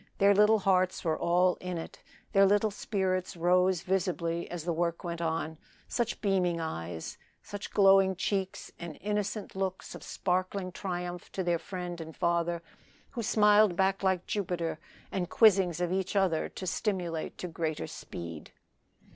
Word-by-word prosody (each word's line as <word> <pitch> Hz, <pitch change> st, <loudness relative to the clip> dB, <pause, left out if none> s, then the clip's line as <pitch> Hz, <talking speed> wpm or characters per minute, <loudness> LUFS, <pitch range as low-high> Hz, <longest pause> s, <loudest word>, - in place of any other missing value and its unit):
Their 200 Hz, +1 st, +5 dB
little 210 Hz, +2 st, +5 dB
hearts 185 Hz, -2 st, +2 dB
were 160 Hz, -1 st, +2 dB
all 180 Hz, +1 st, +3 dB
in 180 Hz, -1 st, -3 dB
it. 165 Hz, -, -8 dB, 0.3 s
Their 195 Hz, 0 st, +6 dB
little 205 Hz, +2 st, +3 dB
spirits 190 Hz, -3 st, -2 dB
rose 180 Hz, +1 st, +3 dB
visibly 175 Hz, -3 st, -1 dB
as 175 Hz, -2 st, -5 dB
the 170 Hz, 0 st, -1 dB
work 170 Hz, 0 st, -1 dB
went 170 Hz, -1 st, -4 dB
on 160 Hz, -1 st, -2 dB, 0.3 s
such 240 Hz, -1 st, -2 dB
beaming 185 Hz, -4 st, +1 dB
eyes 85 Hz, -, -5 dB, 0.2 s
such 205 Hz, 0 st, -7 dB
glowing 195 Hz, -1 st, +5 dB
cheeks 195 Hz, 0 st, -2 dB
and 170 Hz, -3 st, -7 dB
innocent 210 Hz, 0 st, -2 dB
looks 190 Hz, -1 st, -3 dB
of -, -, -9 dB
sparkling 185 Hz, +1 st, -2 dB
triumph 175 Hz, -1 st, -5 dB
to 190 Hz, -, -1 dB
their 175 Hz, -1 st, +1 dB
friend 175 Hz, -1 st, -6 dB
and 160 Hz, -1 st, -9 dB
father, 170 Hz, -1 st, 0 dB, 0.5 s
who 245 Hz, -, -4 dB
smiled 210 Hz, -3 st, +5 dB
back 190 Hz, +1 st, +2 dB
like 190 Hz, -2 st, +1 dB
Jupiter, 175 Hz, -5 st, -2 dB, 0.3 s
and 180 Hz, -3 st, -2 dB
quizzings 190 Hz, -6 st, +4 dB
of 175 Hz, -1 st, 0 dB
each 190 Hz, +1 st, -1 dB
other 185 Hz, -5 st, +2 dB
to 185 Hz, -, -7 dB
stimulate 180 Hz, -5 st, -2 dB
to 180 Hz, -, -4 dB
greater 160 Hz, -2 st, -3 dB
speed. 85 Hz, -2 st, -8 dB
180 Hz, 155 wpm, -30 LUFS, 170-195 Hz, 0.5 s, Their